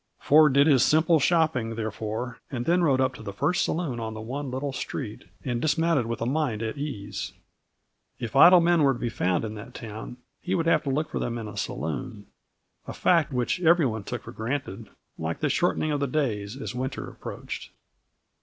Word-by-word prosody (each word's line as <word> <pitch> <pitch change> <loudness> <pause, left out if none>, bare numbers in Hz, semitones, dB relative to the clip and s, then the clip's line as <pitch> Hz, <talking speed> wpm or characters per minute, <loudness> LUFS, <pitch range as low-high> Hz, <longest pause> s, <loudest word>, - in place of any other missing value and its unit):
Ford 150 -1 +5
did 140 +1 +6
his 140 -5 +5
simple 160 +1 +4
shopping, 145 -7 +2
therefore, 110 +2 -4
and 120 -3 -4
then 175 +2 +3
rode 140 -6 +3
up 130 0 +2
to 130 - -11
the 105 -2 -5
first 145 - +1
saloon 155 -8 -2
on 110 -1 -4
the - - -6
one 135 +5 -4
little 135 +2 -3
street, 125 -3 -5 0.2
and 120 -2 -1
dismounted 155 -4 +2
with 115 -1 -4
a - - -1
mind 125 -5 0
at 110 +2 -3
ease. 125 -9 -5 0.8
If 115 -3 -6
idle 180 0 +9
men 170 -1 +3
were 140 -2 +4
to 120 - -7
be 120 - -1
found 90 0 0
in 110 - -5
that 110 +4 -10
town, 110 +2 -7 0.2
he 185 +1 -1
would 165 -3 0
have 165 - +4
to - - -1
look 150 +3 0
for - - -2
them 120 0 -2
in 115 -2 -5
a 105 - -8
saloon; 100 - -4 0.6
a - - -5
fact 165 -5 +2
which 125 +7 -1
every 170 -2 +5
one 110 -4 -2
took 120 +1 -5
for - - -9
granted, 115 -3 -4 0.3
like 80 +1 -3
the - - 0
shortening 155 - +1
of 145 - 0
the 140 - 0
days 125 -5 -2
as 135 - -5
winter 130 +1 -4
approached. - - -7
130 Hz, 205 wpm, -26 LUFS, 110-150 Hz, 0.8 s, idle